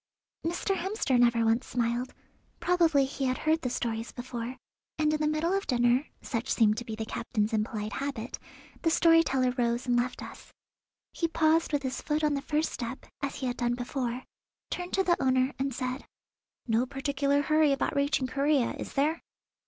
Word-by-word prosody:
Mr. 350 +4 0
Hemster 365 - 0
never 235 -1 +4
once 225 +2 +2
smiled; 240 +1 -1 0.4
probably 330 -6 +3
he 270 0 -3
had 255 0 +1
heard 315 +1 +1
the 250 - -1
stories 230 -2 -3
before, 245 0 -5 0.4
and 305 0 +2
in 305 - 0
the 300 - +2
middle 315 +4 +1
of 390 - -2
dinner 245 +2 +3 0.2
(such 235 0 -3
seemed 215 -2 +4
to - - -6
be 225 -2 -5
the 220 0 -4
captain's 220 -1 -2
impolite 215 -1 -1
habit) 265 -1 -4 0.4
the 330 - +2
story 330 0 +6
teller 260 -5 +1
rose 235 +1 +1
and 245 -1 +2
left 245 +1 -1
us. - - -11 0.6
He 335 - 0
paused 320 0 +2
with 290 -2 0
his 260 0 -3
foot 300 +1 -1
on 300 -1 +3
the 280 - -1
first 305 +2 0
step, 240 +2 -5 0.2
as 280 -1 -2
he 265 - -4
had 245 -1 -2
done 240 0 0
before, 245 0 -3 0.5
turned 355 0 -4
to 385 - +3
the 350 -2 +2
owner, 260 +1 +2
and 270 +1 0
said: 255 +1 -3 0.6
"No 235 +2 +1
particular 280 +1 0
hurry 310 0 +4
about 275 +1 0
reaching 280 -1 +1
Corea, 275 0 +1
is - - -6
there?" 300 +4 +1
265 Hz, 185 wpm, -29 LUFS, 240-305 Hz, 0.6 s, story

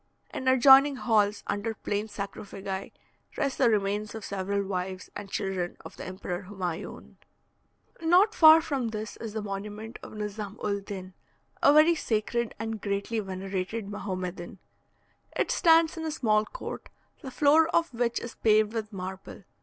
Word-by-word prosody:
In 260 - -4
adjoining 270 +2 +7
halls, 210 -4 +1
under 220 +2 -2
plain 210 0 -3
sarcophagi, 195 -1 -6 0.5
rest 280 -3 -1
the 255 -3 +5
remains 210 0 -1
of 220 - -7
several 200 +1 -2
wives 185 0 -4
and 205 -1 -7
children 190 -3 -3
of - - -10
the - - -8
Emperor 185 0 -5
Humaione. 180 -5 -6 0.8
Not 360 +7 +4
far 320 -6 +8
from 275 -7 -2
this 215 -1 -5
is 225 -2 -7
the 220 -1 -3
monument 210 +3 -6
of - - -10
Nizam 210 0 -5
ul 200 -1 0
din, 190 -2 -8 0.5
a - - +7
very 310 +3 +6
sacred 235 -4 -1
and 225 0 -4
greatly 200 +3 -2
venerated 195 +2 -4
Mahomedan. 185 -3 -5 0.8
It - - 0
stands 330 0 +4
in 325 - -5
a 320 - -2
small 215 -8 +2
court, - - -8 0.3
the 270 - -7
floor 300 +4 +4
of 335 -5 +1
which 235 0 0
is 235 - -7
paved 215 0 +3
with 220 -2 -4
marble. 190 +1 -7
215 Hz, 155 wpm, -28 LUFS, 195-250 Hz, 0.8 s, far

